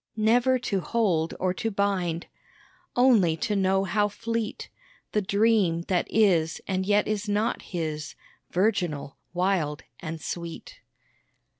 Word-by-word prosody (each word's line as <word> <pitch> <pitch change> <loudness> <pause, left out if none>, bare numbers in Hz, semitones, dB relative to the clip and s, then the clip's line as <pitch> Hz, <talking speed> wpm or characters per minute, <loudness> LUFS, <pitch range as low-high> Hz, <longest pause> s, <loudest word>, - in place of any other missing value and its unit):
Never 245 +4 +4
to 215 -6 -1
hold 180 -6 0
or 185 -1 +1
to 225 +4 -2
bind 190 -5 -1 0.7
Only 225 -11 +4
to 210 +6 -1
know 190 0 +2
how 205 +2 +1
fleet 225 +1 -3 0.4
The 210 - +1
dream 200 -4 +2
that 180 -2 +1
is 175 -7 +3
and 190 -1 -1
yet 205 0 +3
is 210 0 -2
not 210 +3 0
his, 155 -4 -4 0.3
Virginal 175 -8 0 0.2
wild 175 -5 0 0.2
and 165 -1 -5
sweet. 175 - -6
195 Hz, 125 wpm, -26 LUFS, 170-215 Hz, 0.7 s, Never